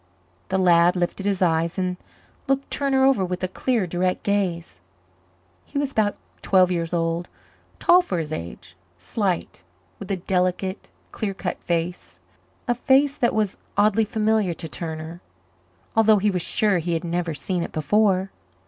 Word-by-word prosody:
The 190 - +1
lad 175 -1 +4
lifted 180 +2 -2
his 195 -2 +1
eyes 165 0 +1
and 185 -1 -1 0.5
looked 270 0 0
Turner 270 -2 +2
over 265 -8 +3
with 180 0 -3
a - - +2
clear, 230 +2 0
direct 180 +1 -1
gaze. 190 -5 -1 0.8
He - - -7
was 280 -1 0
about 210 -4 +1 0.2
twelve 185 -1 +4
years 170 -2 -1
old, 170 0 -1 0.5
tall 360 +1 +5
for 190 - -3
his 160 -2 -3
age, 85 - -7 0.2
slight, 175 - -2 0.4
with 200 - -8
a 195 - +1
delicate, 185 +1 -1 0.2
clear 200 -3 -3
cut 180 -2 -4
face 170 - -3 0.5
a 240 - +3
face 275 +3 +3
that 240 -6 +1
was 210 -3 0 0.2
oddly 215 +1 +4
familiar 215 -4 +1
to 165 - -6
Turner, 160 +1 -6 0.7
although 220 -1 +5
he 205 +1 +2
was 180 -2 -1
sure 205 +1 +1
he 170 +1 -2
had 165 - -3
never 170 -1 -2
seen 175 +6 -2
it - - -4
before. 190 +4 +1
185 Hz, 155 wpm, -23 LUFS, 170-215 Hz, 0.8 s, tall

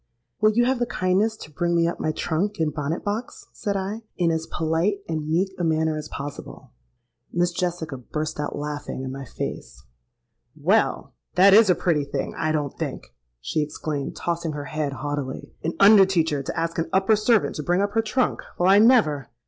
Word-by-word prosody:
'Will 215 0 +5
you 240 +2 +3
have 260 0 +1
the 240 - 0
kindness 200 +4 +1
to 155 - -11
bring 170 +3 0
me 170 0 +3
up 170 - -3
my 155 - 0
trunk 185 +7 -1
and 155 -3 0
bonnet 150 +2 -3
box?' 215 +4 -4
said 200 -1 -2
I, 200 +4 -4 0.2
in 170 -2 +2
as 160 0 -2
polite 165 +5 0
and 155 -2 -3
meek 185 +4 +1
a - - -1
manner 160 -1 +1
as 155 - -5
possible.—Miss 140 - -6
Jessica 170 -5 -3
burst 155 +5 -4
out 150 - -3
laughing 145 -2 -5
in 130 - -4
my 135 0 -7
face. 65 - -6 0.8
'Well! - - +1 0.2
that 195 +2 +7
is 215 -1 +7
a 180 - +5
pretty 165 -5 +1
thing, 140 -1 -4
I 155 -1 0
don't 145 -3 -2
think!' - - -5 0.3
she 155 - -1
exclaimed, 150 -1 -4
tossing 170 -2 -2
her 145 -1 -5
head 155 -1 -2
haughtily: 140 0 -5
'an 165 - -1
under 200 -1 +8
teacher 160 -6 +1
to 135 - -4
ask 165 0 -2
an 165 - -1
upper 190 +3 +4
servant 215 0 +2
to - - -2
bring 175 +5 +2
up 205 - -1
her 225 +2 +2
trunk! 235 +4 0 0.2
Well—I 190 +3 +5
never!' 210 - +4
165 Hz, 190 wpm, -24 LUFS, 150-195 Hz, 0.8 s, under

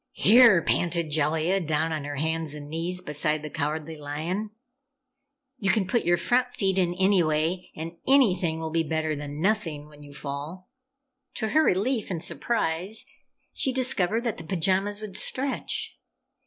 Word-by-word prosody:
"Here!" 220 -5 +6
panted 170 -2 0
Jellia, 160 +5 +1
down 160 -1 0
on 150 -2 -3
her 145 0 -4
hands 160 +1 -1
and 145 -1 -8
knees 175 +3 -2
beside 150 0 0
the 150 - -6
Cowardly 155 +2 -3
Lion, 160 +8 -3 1.1
"you 195 - 0
can 210 -2 +3
put 230 +6 0
your 175 0 +4
front 245 +4 +1
feet 190 -2 +1
in 175 -1 +1
anyway 180 -2 +2
and 165 +2 -7
anything 190 -12 +3
will 160 -1 -4
be 165 +1 +2
better 160 -1 -1
than 145 0 -6
nothing, 165 -6 -1
when 150 -1 -16
you 145 -1 -12
fall!" 150 - -7 0.6
To 220 - -2
her 310 - +4
relief 225 +2 +1
and 170 -3 -3
surprise, 170 +3 -2 0.5
she 265 - +1
discovered 235 -4 0
that 235 -4 -2
the 165 - -8
pajamas 190 +4 0
would 210 -3 -7
stretch! 270 +1 -2
170 Hz, 155 wpm, -26 LUFS, 155-200 Hz, 1.1 s, Here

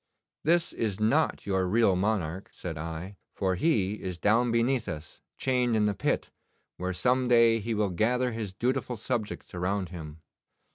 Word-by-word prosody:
"This 170 +2 +2
is 105 -4 -2
not 135 +9 +2
your 95 -2 +1
real 105 -1 +3
monarch," 95 -2 -1
said 85 -3 -6
I, 80 +5 -6 0.2
"for 95 -1 +1
he 105 - +1
is 90 -2 -4
down 115 +6 +3
beneath 115 +1 +1
us 75 -3 -7 0.2
chained 125 -3 +1
in 105 -1 +3
the 105 - +2
pit, - - -1 0.5
where 90 +1 -2
some 125 +7 +1
day 115 -2 +5
he 110 +1 -2
will 105 -2 +1
gather 125 +7 +1
his 110 -4 -4
dutiful 125 +4 -1
subjects 110 -1 -3
around 90 +1 -1
him." 80 -3 -9
105 Hz, 160 wpm, -28 LUFS, 90-120 Hz, 0.5 s, day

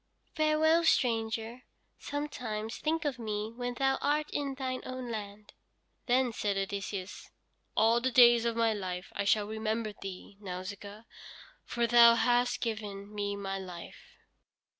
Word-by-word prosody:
"Farewell, 315 +1 +3
stranger. 230 -4 +1 0.4
Sometimes 245 -7 -4
think 320 +1 -1
of 270 -4 -1
me 215 -1 -3
when 245 0 -4
thou 270 +1 +1
art 300 +1 0
in 280 -2 -2
thine 260 -1 -3
own 255 -2 -6
land." 205 -1 -7 0.5
Then 250 -1 +2
said 205 -2 -1
Odysseus: 195 0 -4 0.5
"All 230 +2 +4
the 260 - +1
days 240 -2 +7
of 235 -1 0
my 230 -1 +2
life 185 -3 -5
I 200 - -1
shall 210 +1 +3
remember 220 0 -2
thee, 195 0 -9
Nausicaa, 200 +3 -7 0.6
for 235 0 0
thou 235 0 +7
hast 245 +1 +2
given 210 -3 -4
me 205 -1 -2
my 195 -1 -4
life." 180 -3 -10
225 Hz, 140 wpm, -31 LUFS, 205-250 Hz, 0.6 s, days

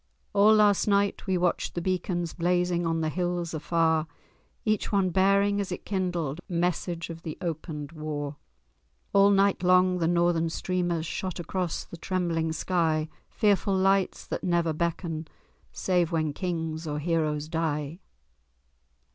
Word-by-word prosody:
All 210 +2 +6
last 210 -2 +4
night 200 0 +1
we 190 -1 +2
watched 175 -1 0
the - - 0
beacons 175 -2 -1
Blazing 175 0 +1
on 165 0 0
the 155 - 0
hills 175 0 -2
afar, 160 0 +1 0.6
Each 215 -1 0
one 195 -3 +2
bearing, 200 +2 +3
as 195 - -5
it 180 - -5
kindled, 175 -6 -2
Message 175 -1 -1
of 165 0 -9
the 160 -2 -6
opened 155 -3 -5
war. 150 -2 -5 0.8
All 200 0 +6
night 200 0 +3
long 180 0 +4
the 165 - +1
northern 170 -1 +2
streamers 175 -1 -1
Shot 185 +2 -4
across 175 0 -2
the 170 - -10
trembling 170 -3 -1
sky: 160 -2 0 0.2
Fearful 200 -2 +2
lights 195 0 +2
that - - -4
never 170 -3 +1
beckon 165 0 -2 0.4
Save 180 -3 0
when 155 -3 0
kings 165 -2 -3
or 150 -1 -2
heroes 155 -1 0
die. 160 -1 -2
175 Hz, 140 wpm, -27 LUFS, 160-185 Hz, 0.8 s, All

